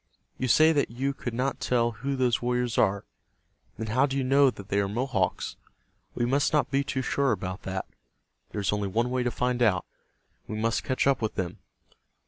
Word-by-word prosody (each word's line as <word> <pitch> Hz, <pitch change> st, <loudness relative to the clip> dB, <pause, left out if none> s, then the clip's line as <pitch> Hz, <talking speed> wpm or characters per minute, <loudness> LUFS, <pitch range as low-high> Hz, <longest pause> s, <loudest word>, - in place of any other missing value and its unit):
You 130 Hz, -, 0 dB
say 155 Hz, +7 st, +6 dB
that 145 Hz, -2 st, +1 dB
you 135 Hz, +4 st, -2 dB
could 120 Hz, -3 st, -5 dB
not 130 Hz, +2 st, -1 dB
tell 120 Hz, -1 st, +1 dB
who 135 Hz, +5 st, -3 dB
those 125 Hz, -3 st, +1 dB
warriors 125 Hz, -1 st, 0 dB
are. 100 Hz, -1 st, +2 dB, 0.7 s
Then 110 Hz, -, -3 dB
how 130 Hz, +6 st, +2 dB
do 135 Hz, 0 st, -2 dB
you 135 Hz, -, +1 dB
know 135 Hz, +1 st, +5 dB
that 100 Hz, -5 st, -9 dB
they 100 Hz, -, +2 dB
are 100 Hz, -, +1 dB
Mohawks? 105 Hz, -3 st, -1 dB, 0.6 s
We 120 Hz, -, +1 dB
must 140 Hz, +5 st, +1 dB
not 150 Hz, -, +2 dB
be 140 Hz, 0 st, +2 dB
too 130 Hz, -1 st, -2 dB
sure 140 Hz, -1 st, +1 dB
about 95 Hz, -2 st, -3 dB
that. 95 Hz, 0 st, -3 dB, 0.6 s
There 105 Hz, -, -4 dB
is 100 Hz, -, +1 dB
only 105 Hz, -1 st, -1 dB
one 115 Hz, +5 st, 0 dB
way 130 Hz, 0 st, 0 dB
to 125 Hz, -, +1 dB
find 125 Hz, +1 st, -1 dB
out. 100 Hz, -7 st, +3 dB, 0.6 s
We 110 Hz, -, -4 dB
must 115 Hz, +1 st, 0 dB
catch 130 Hz, -, 0 dB
up 135 Hz, -2 st, +3 dB
with 110 Hz, -, -2 dB
them. 90 Hz, -2 st, -3 dB
125 Hz, 205 wpm, -27 LUFS, 105-135 Hz, 0.7 s, say